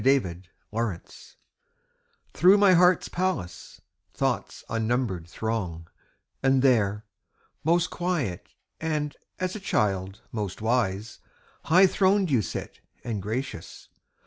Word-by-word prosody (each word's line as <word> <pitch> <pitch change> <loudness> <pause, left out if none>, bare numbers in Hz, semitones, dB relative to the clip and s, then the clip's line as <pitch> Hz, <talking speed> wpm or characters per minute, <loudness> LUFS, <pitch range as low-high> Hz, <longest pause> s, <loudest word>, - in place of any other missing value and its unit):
Day 135 +5 +5
and 90 -7 -4 0.3
Night 110 -6 -5 1.0
Through 185 +4 +6
my 200 -2 +6
heart's 180 0 +4
palace 175 - -3 0.3
Thoughts - - -2
unnumbered 115 -6 -1
throng; 90 -5 -4 0.5
And 135 -1 +3
there, 105 -5 +2 0.6
most 170 +2 +2
quiet 170 - -2 0.3
and, 150 -2 -2 0.2
as 185 +1 -2
a - - -4
child, 95 - -1
most 105 -5 -4
wise, 110 -2 -1 0.5
High 185 +4 +6
throned 190 -1 +2
you 125 -5 +4
sit, - - -6 0.2
and 110 -5 -3
gracious. 110 -3 -5
120 Hz, 110 wpm, -26 LUFS, -, 1.0 s, Through